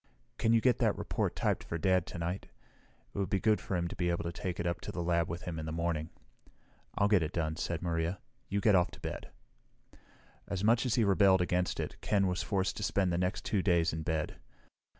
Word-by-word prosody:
"Can 115 - +3
you 115 -1 +5
get 125 -1 +3
that - - +2
report - - -1
typed - - 0
for 80 - -4
Dad 95 0 +2
tonight? 85 +2 -4 0.7
It - - -4
would 100 - 0
be 95 - +1
good 110 +1 +2
for 95 - -3
him 85 -1 0
to - - -6
be 85 -1 0
able 85 - 0
to 85 - -3
take 90 +1 -4
it 85 0 -1
to - - -5
the 85 - -3
lab 85 -1 +1
with 85 +2 -5
him 85 -3 -4
in 80 - -5
the - - -3
morning." 80 -1 -1 0.9
"I'll 100 - +4
get 105 -3 +4
it 80 -1 -2
done," 80 -2 -1
said 85 +1 -3
Maria. 85 +1 -1 0.3
"You 100 +1 0
get 105 - +5
off 90 -2 +4
to - - -11
bed." - - -6 1.2
As 100 -1 -3
much 115 +4 +4
as 115 - +1
he 120 - +3
rebelled 95 -2 +5
against 90 0 0
it, - - -4
Ken 100 -2 +2
was 90 0 0
forced 95 -1 -1
to 105 - -3
spend 95 -3 +1
the 85 - +1
next 90 +2 -1
two 100 -3 +1
days 85 -3 +2
in 80 - -3
bed. 80 -1 -1
Dr. - - -14
90 Hz, 235 wpm, -32 LUFS, 85-100 Hz, 1.2 s, you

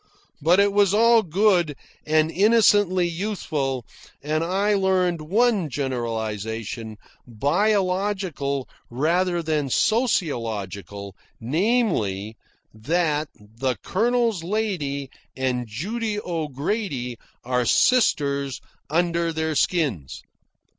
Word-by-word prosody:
But 170 +6 +4
it 200 0 +3
was 205 -1 +3
all 230 +1 +5
good 180 -4 +2 0.3
and 155 +1 +3
innocently 205 -2 +4
youthful, 160 - -3 0.4
and 155 +2 0
I 195 +4 +1
learned 185 -4 +1
one 200 +1 +1
generalisation, 115 -4 -4 0.3
biological 180 - 0 0.2
rather 170 +7 0
than 155 -3 -1
sociological, 110 - -1 0.2
namely, 125 - 0 0.4
that 155 +6 0
the 115 +4 -4
"Colonel's 230 -3 +1
lady 165 -9 -2 0.3
and 125 -2 -1
Judy 210 - -3
O'Grady 150 - -3 0.2
are 125 -1 0
sisters 140 - +2 0.3
under 170 +1 +1
their 160 0 -1
skins." 140 - -1
160 Hz, 85 wpm, -23 LUFS, 130-200 Hz, 0.4 s, all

